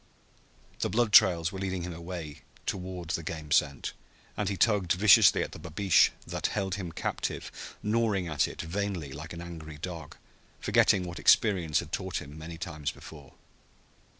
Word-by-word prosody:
The - - 0
blood 110 +2 +1
trails 85 -1 +6
were 95 - -6
leading 95 -2 -3
him 90 0 -5
away 85 -3 -7 0.2
toward 90 -2 -4
the 85 - -1
game 80 -2 -6
scent, 70 -2 +1 0.4
and 105 -2 -1
he 100 - -3
tugged 100 -6 +3
viciously 95 +2 +6
at - - -6
the - - -9
babeesh 85 +2 +3 0.2
that - - -2
held 95 -3 -2
him 95 -3 -4
captive, - - -5
gnawing 105 -4 +1
at 75 -4 +1
it - - -6
vainly, 85 -4 -3
like 80 +5 -8
an 85 - -7
angry 80 -3 -8
dog, 80 -2 -7 0.4
forgetting 95 - +3
what 85 -1 -6
experience 90 -8 +4
had 75 - -11
taught 95 -2 -2
him 75 +1 -10
many 80 +1 -8
times 80 -4 -4
before. 75 -4 -11
85 Hz, 165 wpm, -29 LUFS, 80-95 Hz, 0.4 s, trails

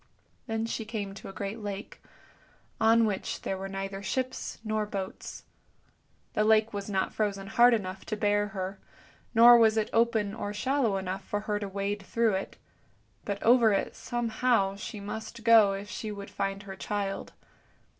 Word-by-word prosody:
Then 225 0 -1
she 230 0 -3
came 215 -3 -5
to 200 - -9
a - - -6
great 200 +3 -5
lake, 205 0 -6 0.8
on 225 +1 +5
which 205 -3 -3
there 195 - -2
were 190 +1 -5
neither 195 0 -5
ships 255 +5 -3
nor 215 -1 -1
boats. 195 -2 -6 0.9
The 215 - +2
lake 220 +1 +4
was 200 0 -4
not 190 -2 -1
frozen 200 -2 -1
hard 240 +4 +5
enough 190 -3 -5
to 215 - -3
bear 205 0 +2
her, 195 -1 -5 0.6
nor 235 +1 +9
was 220 -1 +4
it 215 - 0
open 225 -3 +2
or 205 -1 -4
shallow 245 -2 +1
enough 190 0 -4
for 205 +2 -3
her 210 -1 -2
to 205 - -4
wade 200 +1 -3
through 225 +2 +1
it; 190 +1 -4 0.7
but 200 -1 -3
over 230 -2 +6
it 195 - -1
somehow 230 -4 0
she 210 +1 -7
must 220 +3 -7
go 220 -3 +6
if 200 +1 -5
she 215 +1 -5
would 200 -1 -8
find 195 +1 -3
her 195 -1 -8
child. 200 0 -3
205 Hz, 170 wpm, -29 LUFS, 195-225 Hz, 0.9 s, nor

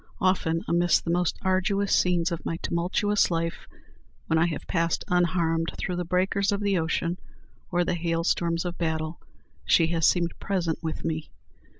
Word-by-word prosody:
Often, 170 -3 +1
amidst 175 +1 +2
the 170 - 0
most 175 0 +1
arduous 195 +2 +1
scenes 175 -1 +2
of 170 - -4
my 165 - -2
tumultuous 190 +4 +1
life, 165 -1 -2 0.6
when 160 - +2
I 170 - +4
have 165 - -4
passed 165 -2 0
unharmed 170 -2 +1
through 180 - -2
the 180 - -2
breakers 190 +3 +1
of 200 - 0
the 200 -3 +1
ocean 165 +2 -1 0.5
or 175 0 +1
the - - 0
hail 165 -1 -1
storms 170 0 0
of 175 -1 -4
battle, 160 -1 -2 0.4
she 165 - +4
has 165 -2 +3
seemed 175 -2 +1
present 175 -5 -1
with 160 -2 -4
me. 160 -1 -3
170 Hz, 170 wpm, -26 LUFS, 165-180 Hz, 0.6 s, I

